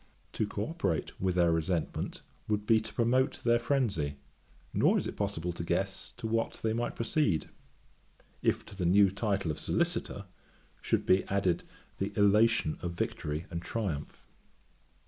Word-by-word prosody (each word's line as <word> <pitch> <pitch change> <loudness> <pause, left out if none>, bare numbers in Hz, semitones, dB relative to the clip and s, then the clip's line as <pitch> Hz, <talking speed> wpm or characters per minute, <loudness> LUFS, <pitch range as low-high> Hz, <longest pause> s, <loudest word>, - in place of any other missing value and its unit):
To 110 - 0
co 105 0 -3
operate 100 - -1
with 90 -1 +1
their 85 -2 +4
resentment 80 0 -1 0.2
would 105 -1 0
be 110 0 +5
to 110 - -7
promote 125 +3 +2
their 120 0 +4
phrenzy; 110 - 0 0.6
nor - - +4
is - - -1
it - - -4
possible 85 +2 -2
to 85 - -5
guess 85 - -1
to - - -6
what 115 +1 -1
they 110 -1 +1
might 120 +1 -2
proceed, 115 - +1 0.9
if - - +1
to - - -11
the 90 -3 0
new 100 +1 +6
title 100 -4 0
of 75 - -5
Solicitor, 170 - -1 0.6
should - - 0
be 95 +1 +4
added 95 -3 0 0.3
the - - -2
elation 105 -4 +4
of 85 -1 -3
victory 75 -1 -3
and 85 - -3
triumph. 90 -6 -4
100 Hz, 155 wpm, -31 LUFS, 85-115 Hz, 0.9 s, new